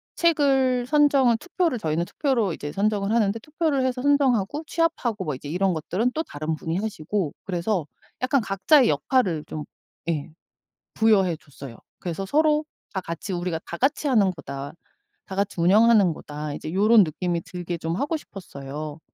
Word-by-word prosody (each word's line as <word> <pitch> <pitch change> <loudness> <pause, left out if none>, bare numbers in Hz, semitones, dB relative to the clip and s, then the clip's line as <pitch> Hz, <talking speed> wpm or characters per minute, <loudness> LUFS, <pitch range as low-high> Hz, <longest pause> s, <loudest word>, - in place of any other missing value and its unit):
책을 270 -7 +3
선정을 275 -4 +4
투표를 350 -1 -1
저희는 165 -3 -1
투표로 235 - 0
이제 145 -1 -6
선정을 200 +2 0
하는데 220 -2 +2
투표를 300 +1 -1
해서 255 -1 -1
선정하고 280 -2 +2
취합하고 280 - -1
뭐 150 -3 -2
이제 130 - -9
이런 185 +3 +1
것들은 185 +9 -1
또 320 - 0
다른 155 - -4
분이 165 +2 -3
하시고. 195 -4 -2
그래서 180 -1 -1 0.4
약간 260 +1 +2
각자의 225 +7 +4
역할을 190 - +1
좀 150 -1 -6 0.4
예 155 -1 -2 0.6
부여해 200 -6 +3
줬어요. 140 -5 -11 0.2
그래서 180 +2 -4
서로 300 +6 +3 0.3
다 190 - -2
같이 175 +3 -5
'우리가 175 -2 -2
다 - - -6
같이 280 - +1
하는 215 -8 +4
거다. 140 -4 -7 0.5
다 190 - -7
같이 200 -2 -1
운영하는 205 0 +5
거다.' 150 0 -6
이제 155 - -6
요런 210 +3 +6
느낌이 170 +1 -2
들게 175 0 -5
좀 165 0 -3
하고 290 +7 -1
싶었어요. 150 - -8
195 Hz, 355 characters per minute, -24 LUFS, 165-255 Hz, 0.6 s, 요런